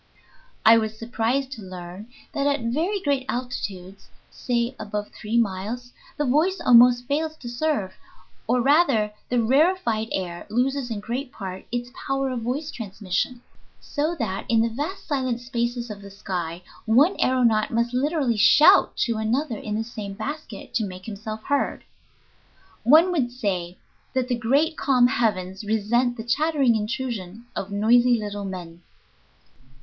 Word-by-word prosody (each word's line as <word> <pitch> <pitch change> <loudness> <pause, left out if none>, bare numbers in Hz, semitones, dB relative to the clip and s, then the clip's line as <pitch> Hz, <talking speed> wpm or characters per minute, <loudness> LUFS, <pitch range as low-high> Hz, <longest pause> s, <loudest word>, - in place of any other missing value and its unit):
I 225 +1 +8
was 220 0 -3
surprised 240 +4 -1
to 245 -6 -7
learn 185 +2 -9 0.3
that 280 0 0
at 285 -2 +1
very 320 - 0
great 280 -4 0
altitudes, 200 -6 -5 0.2
say 240 +1 -1
above 210 0 -4
three 220 +2 -3
miles, 230 +3 -1 0.3
the 295 - 0
voice 315 +9 +2
almost 245 0 +6
fails 310 +4 -1
to 245 - -10
serve, 240 -6 -1 0.5
or, 245 +2 +2
rather, 265 -8 +3 0.2
the 245 -2 +2
rarefied 265 -4 +2
air 175 -2 -4
loses 255 +2 0
in 215 -3 -4
great 250 +5 -4
part 190 -2 -7
its 245 0 -3 0.2
power 270 0 0
of 245 -2 -3
voice 280 +7 -3
transmission, 215 +2 -3 0.4
so 310 +3 -2
that 195 -7 -3
in 225 -1 +4
the 230 - +1
vast 295 - -4
silent 260 -5 -1
spaces 240 -1 -3
of 205 -1 -8
the 200 - -10
sky 180 -3 -5 0.2
one 280 - +5
aëronaut 235 -4 +2
must 235 +1 0
literally 270 -3 +1
shout 270 +8 +6
to 230 -2 -1
another 230 +3 -1
in 210 -1 -4
the 220 - -1
same 215 -3 -7
basket 290 +8 -7
to 225 - +1
make 185 -2 -7
himself 215 0 -6
heard. 285 0 -1 1.0
One 315 +10 +6
would 265 -9 0
say 185 -7 -3 0.4
that 255 -1 0
the 245 - +2
great, 280 +8 +1
calm 255 -3 +4
heavens 200 -5 0
resent 225 +4 +1
the 225 - -5
chattering 275 0 +2
intrusion 220 -2 -4
of 195 - -4
noisy 240 +4 +4
little 205 -1 -5
men. 175 -3 -7
235 Hz, 150 wpm, -24 LUFS, 210-265 Hz, 1.0 s, I